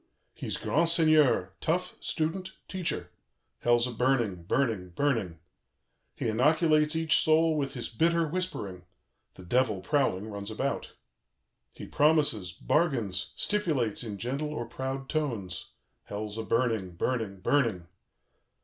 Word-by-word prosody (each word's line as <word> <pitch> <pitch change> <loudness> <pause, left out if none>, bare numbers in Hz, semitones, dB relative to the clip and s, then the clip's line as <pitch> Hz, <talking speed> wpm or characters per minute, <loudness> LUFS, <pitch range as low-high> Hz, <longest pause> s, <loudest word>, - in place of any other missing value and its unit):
"He's - - -3
grand 165 +3 +1
seigneur, 155 - +4
tough, 180 +3 0
student, 180 +4 -2
teacher. 160 - -2 0.5
Hell's 120 0 +3
a 125 - -2
burning, 120 -6 +1
burning, 110 -5 0
burning. 105 - -1 0.8
"He - - -2
inoculates 150 +6 +3
each 160 -1 +4
soul 160 0 +4
with 140 -2 -2
his 120 - -3
bitter 165 +7 +2
whispering: 105 - -4 0.5
the 90 - -12
Devil, 110 -1 +1
prowling, 110 -7 0
runs 100 0 -5
about. 135 +6 -3 0.8
"He - - -9
promises, 145 - +2
bargains, 115 - 0
stipulates 150 - 0
in 105 -4 -5
gentle 135 +8 -3
or 135 -6 -3
proud 130 +3 -4
tones. 115 - -3 0.4
Hell's 105 +1 -5
a - - -2
burning, 110 -6 0
burning, 110 -2 -2
burning. 110 -6 +1
130 Hz, 120 wpm, -29 LUFS, 105-155 Hz, 0.8 s, seigneur